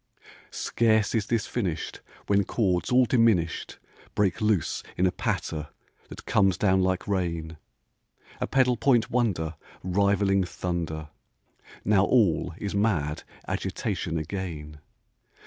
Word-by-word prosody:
Scarce 110 -2 +1
is 110 -2 0
this 115 -3 0
finished 90 -10 -3 0.2
When 100 0 +3
chords 95 -4 0
all 125 0 +5
diminished 110 -9 +1 0.4
Break 100 -1 +1
loose 105 -7 +1 0.2
in 90 - +3
a 90 - +3
patter 75 -4 -3 0.4
that - - -10
comes 95 -3 +3
down 95 -2 +3
like 95 +1 0
rain, 85 -5 -2 0.8
A - - -1
pedal 125 -2 +3
point 115 -2 +2
wonder 100 -10 0 0.3
Rivaling 100 +1 +2
thunder. 85 -4 -4 0.8
Now 100 -1 +4
all 95 -8 +2
is 100 -1 -4
mad 95 -8 0 0.3
agitation 80 - -2
again. 80 -3 -5
95 Hz, 115 wpm, -27 LUFS, 85-110 Hz, 0.8 s, all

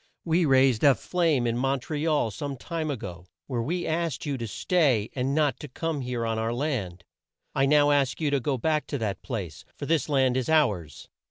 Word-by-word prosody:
We 165 +1 +2
raised 130 -4 +4
a 140 -3 +7
flame 165 -8 +1
in 120 0 0
Mon 135 +1 +1
tre 150 +4 -3
al 150 -8 +1
some 140 +6 -5
time 160 +2 -4
a 140 - -2
go, 90 -4 -8 0.2
where 125 -4 -2
we 175 +9 -2
asked 160 -5 -2
you 145 -2 -1
to 115 - -3
stay 130 - +1
and 135 +1 -1
not 150 -3 +1
to 150 - -7
come 155 +2 -3
here 125 -2 -3
on 115 -1 -1
our 115 +1 -1
land. 110 - -3 0.5
I 135 0 +2
now 145 0 +5
ask 140 -3 +1
you 150 -3 0
to 140 - +2
go 135 +1 -1
back 155 +5 0
to 145 - -2
that 110 -5 -3
place, 95 - -5
for 140 - -5
this 160 0 +1
land 130 -3 +2
is 130 +3 -1
ours. 105 - +1
135 Hz, 220 wpm, -26 LUFS, 115-150 Hz, 0.5 s, a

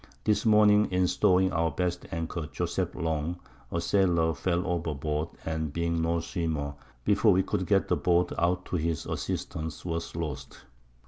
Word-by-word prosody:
This 105 +1 +2
Morning 105 -1 +6
in 90 0 +2
Stowing 95 +1 +3
our 85 0 +2
best 90 +3 -2
Anchor, 80 -1 -3
Joseph 90 +1 -2
Long, 80 0 -2 0.3
a 85 - 0
Sailor, 85 -3 +2
fell 85 +4 -1
over 85 -4 -1
Board, 75 +3 -2 0.2
and 80 -2 -2
being 85 +1 -1
no 85 0 +1
Swimmer, 80 -4 -2 0.3
before 105 0 +4
we 95 +1 +3
could - - -2
get - - +3
the - - +1
Boat 90 0 +2
out 90 +1 +1
to 90 - -2
his 80 -1 -1
Assistance, 80 +1 -4
was 85 -2 -3
lost. 80 -5 -5
85 Hz, 165 wpm, -28 LUFS, 80-90 Hz, 0.3 s, Morning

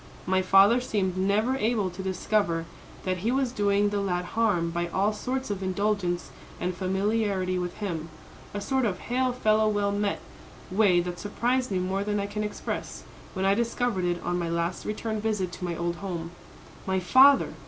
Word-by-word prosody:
"My 185 +1 +2
father 195 +6 +5
seemed 195 -7 -1
never 205 +7 +1
able 215 -5 0
to 180 +2 -7
discover 185 -2 0 0.4
that 185 -1 -1
he 220 +6 0
was 265 -1 +1
doing 205 -2 +2
the 205 0 -1
lad 180 -2 -1
harm 205 -7 +1
by 175 +1 -1
all 195 +5 +1
sorts 255 +3 -3
of 195 -1 -3
indulgence 190 -2 -1 0.3
and 180 +1 -1
familiarity 190 0 0
with 175 0 -4
him, 170 -6 -4 0.4
a 205 - -4
sort 265 +4 0
of 190 -5 -1
hail 255 +5 0
fellow 220 -3 +2
well 205 -1 +1
met 205 0 -1 0.5
way 185 -3 +4
that 175 0 -5
surprised 245 +6 0
me 195 - 0
more 190 +2 -1
than 205 0 -1
I 200 - -1
can 210 +1 -3
express, 210 - -5 0.3
when 190 0 -1
I 195 - +5
discovered 235 -3 0
it 175 0 0
on 175 0 -1
my 170 -1 -2
last 170 +1 -2
return 215 0 -3
visit 210 -5 -1
to 180 - -6
my 170 -1 -2
old 170 0 -2
home. 175 -4 -5 0.6
My 190 0 +1
father! 265 +9 +6
200 Hz, 185 wpm, -27 LUFS, 180-215 Hz, 0.6 s, father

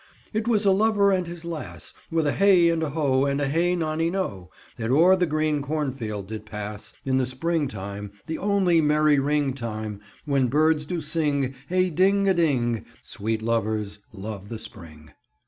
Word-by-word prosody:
"It 220 +1 -1
was 215 -3 +3
a 195 - +6
lover 200 0 +3
and 185 -2 0
his 170 0 -8
lass, 105 - -7 0.2
With 165 -1 +1
a 145 - +2
hey 185 -2 +5
and 165 -1 0
a 160 - -1
ho, 140 -3 +1
and 140 0 0
a 145 - 0
hey 170 +5 +1
nonino, 160 - -2 0.3
That 115 0 -3
o'er 170 +8 +6
the 180 -2 +1
green 155 -1 0
cornfield 135 -9 -3
did 110 0 -6
pass 105 -1 -7
In 130 -1 +1
the 130 -1 +1
spring 155 +4 -1
time, 100 -2 -7
the 160 - -4
only 190 -5 +3
merry 150 -1 +3
ring 145 -1 +1
time, 110 -4 -5 0.2
When 140 -3 +2
birds 150 +3 +2
do 175 0 -2
sing, 145 -4 0 0.2
hey 185 0 +2
ding 195 +4 +3
a 190 - +5
ding 125 - +1 0.2
Sweet 110 +1 -3
lovers 110 -2 -1
love 100 -1 -7
the 115 - -5
spring." 80 -10 -12
145 Hz, 180 wpm, -25 LUFS, 110-170 Hz, 0.3 s, a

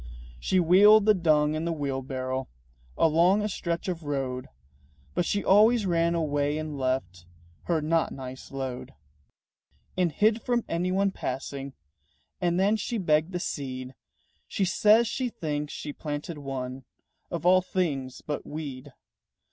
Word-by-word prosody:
She 185 - +1
wheeled 200 +5 +6
the 215 - +6
dung 155 -5 +2
in 155 +1 -2
the 170 - -1
wheelbarrow 130 -3 -3 0.5
Along 175 +6 +4
a - - 0
stretch 170 -4 -3
of 175 -2 -3
road; 135 -4 -3 0.7
But 170 - 0
she 205 - -1
always 215 +3 +5
ran 170 -1 +2
away 145 -2 0
and 155 -1 -4
left 130 -10 -2 0.4
Her 165 -3 0
not 165 +1 +1
nice 130 -1 -8
load. 130 -2 -5 1.0
And 180 -2 +1
hid 220 +6 +2
from 240 0 0
anyone 185 +4 0
passing. 135 -4 -5 0.7
And 175 0 +1
then 205 +3 +3
she 235 +2 -3
begged 160 -3 +2
the 175 - -2
seed. 130 -5 -5 0.5
She 195 - 0
says 215 +5 +4
she 255 +1 -2
thinks 150 -7 -4
she 150 - -6
planted 150 +1 -5
one 130 -1 -5 0.5
Of 170 -1 -4
all 185 +1 +6
things 145 -9 -2
but 150 - -4
weed. 145 -3 -7
160 Hz, 140 wpm, -27 LUFS, 135-185 Hz, 1.0 s, wheeled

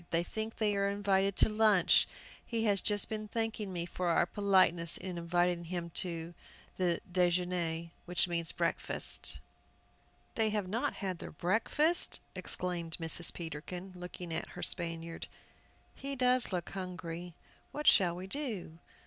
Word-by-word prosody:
They 170 0 +1
think 220 +5 -4
they 210 -2 +1
are 200 0 +2
invited 200 -1 +1
to - - +5
lunch! 215 -4 +5 0.4
He 230 -2 -2
has 205 -3 +3
just 205 -2 +3
been 215 -1 -4
thanking 225 -2 -2
me 170 -2 -3
for 180 +1 -3
our 170 - +4
politeness 185 -4 +3
in 185 -2 -5
inviting 175 0 +1
them 170 0 -4
to 170 -1 -3 0.5
déjeûner, 175 -2 0 0.2
that 180 0 +2
means 170 -1 -1
breakfast!" - - +1 1.0
"They 220 -1 +2
have 210 -3 -1
not 220 +6 -1
had 185 -3 -3
their - - -6
breakfast!" 225 - +1
exclaimed 170 -3 -3
Mrs. 165 +1 +3
Peterkin, 175 +3 -7
looking 180 -1 -7
at 160 - -3
her - - -5
Spaniard; 165 -1 -2 0.7
"he 275 0 -5
does 250 -2 +3
look 180 -2 -2
hungry! 175 -2 -6 0.4
What 300 +1 -5
shall 175 -3 +5
we 180 +1 -6
do?" 195 - -4
180 Hz, 140 wpm, -33 LUFS, 170-205 Hz, 1.0 s, to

